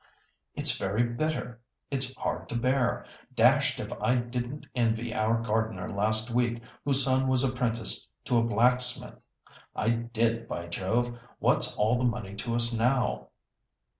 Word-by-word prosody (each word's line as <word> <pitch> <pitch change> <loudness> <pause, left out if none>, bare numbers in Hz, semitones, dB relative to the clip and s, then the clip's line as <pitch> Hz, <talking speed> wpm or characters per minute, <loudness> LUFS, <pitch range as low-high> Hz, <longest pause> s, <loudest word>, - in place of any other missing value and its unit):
It's - - +1
very 100 +5 0
bitter; 120 -1 -3 0.3
it's 130 -1 -2
hard - - -4
to - - -5
bear. 125 +1 0 0.3
Dashed - - +3
if - - -5
I 125 - +2
didn't 125 +3 -4
envy 115 -1 0
our 115 -1 +1
gardener 110 -4 -2
last 110 +3 +1
week, 120 0 0 0.2
whose 135 -2 +5
son 130 0 +2
was 130 0 +2
apprenticed 120 -3 +1
to 120 - +1
a - - +2
blacksmith! 125 +2 +2 0.6
I 110 - 0
did, 115 0 -1
by 85 - -5
Jove! 115 +8 -1 0.2
What's - - +1
all 110 +4 +1
the - - -1
money 115 -5 -2
to 115 +2 -3
us 120 0 +5
now?" 115 - 0
120 Hz, 145 wpm, -28 LUFS, 110-125 Hz, 0.6 s, whose